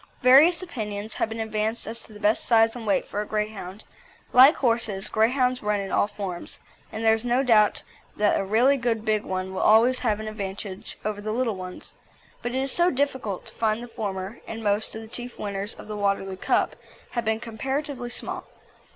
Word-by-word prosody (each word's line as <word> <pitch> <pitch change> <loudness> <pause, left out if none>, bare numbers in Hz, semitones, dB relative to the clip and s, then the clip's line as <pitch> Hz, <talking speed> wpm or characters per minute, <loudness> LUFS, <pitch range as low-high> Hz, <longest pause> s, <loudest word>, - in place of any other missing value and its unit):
Various 295 +8 +7
opinions 215 - -5
have - - -1
been 225 0 -5
advanced 220 +1 -2
as 230 +1 -5
to - - -16
the 210 - -11
best 210 +1 +2
size 225 -1 +4
and 230 -3 -7
weight 200 - +2
for 205 - -3
a - - -4
Greyhound. 210 -2 -4 0.5
Like 260 +5 +8
horses, 225 -5 0
Greyhounds 250 +3 +2
run 210 -1 0
in 195 -1 -4
all - - +3
forms, 195 -4 -6 0.3
and 225 +1 -4
there 220 - +6
is 225 0 -1
no 245 +2 +2
doubt 215 -5 +4 0.3
that 210 -1 +3
a - - 0
really 235 +8 +3
good 230 -3 -1
big 215 -1 +1
one 185 0 -3
will 190 - -2
always 230 +4 +5
have 215 -4 0
an 215 - -5
advantage 200 -2 -6
over 210 -1 -2
the 215 +1 -3
little 230 -1 0
ones; 185 -1 -9 0.5
but 240 +1 -3
it 265 - +1
is 270 - 0
so 345 +5 +3
difficult 260 - -2
to - - -10
find 220 +1 0
the - - -7
former, 200 -2 -5
and 225 0 -6
most 205 +1 0
of 220 - -6
the - - -10
chief 245 +2 -7
winners 200 0 -4
of - - -11
the 215 - -5
Waterloo 200 -2 -1
Cup - - +1 0.4
have 235 - -2
been 220 0 +1
comparatively 255 +3 -4
small. 245 - -4
220 Hz, 205 wpm, -25 LUFS, 205-245 Hz, 0.5 s, Like